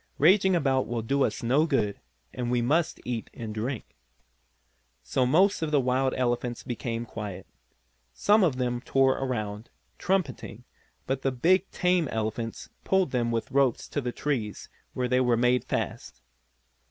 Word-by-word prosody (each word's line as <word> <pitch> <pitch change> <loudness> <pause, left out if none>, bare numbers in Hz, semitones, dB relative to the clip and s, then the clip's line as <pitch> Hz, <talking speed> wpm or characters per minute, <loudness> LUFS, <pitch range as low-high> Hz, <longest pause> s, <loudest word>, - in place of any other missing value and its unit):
Raging 190 +4 +5
about 135 -5 +1
will 115 -2 -3
do 140 +4 +1
us - - -2
no 140 +7 +3
good, 110 -9 0 0.3
and 125 -2 -3
we 125 0 +2
must 155 +8 +1
eat 120 -3 -3
and 110 -2 -6
drink." 115 - -4 1.1
So 125 - +1
most 185 +9 +3
of 160 - -1
the 150 -1 +3
wild 130 +1 +1
elephants 120 -1 -1
became 120 -1 -4
quiet. 105 -4 -7 0.7
Some 205 - +3
of 160 -8 +2
them 125 -1 -1
still - - -19
tore 135 -1 +4
around, 110 -4 -3 0.3
trumpeting, 140 - -2 0.4
but 135 0 -2
the 135 - +1
big 180 +10 +2
tame 180 -3 +1
elephants 110 0 -4
pulled 190 -6 +2
them 120 -2 0
with 115 -1 -2
ropes 135 -3 +2
to 145 - -2
the 125 -2 -3
trees 120 -7 -3 0.3
where 125 -1 0
they 125 +1 +2
were 120 -2 +3
made 125 +1 +2
fast. - - -4
125 Hz, 160 wpm, -27 LUFS, 115-145 Hz, 1.1 s, Raging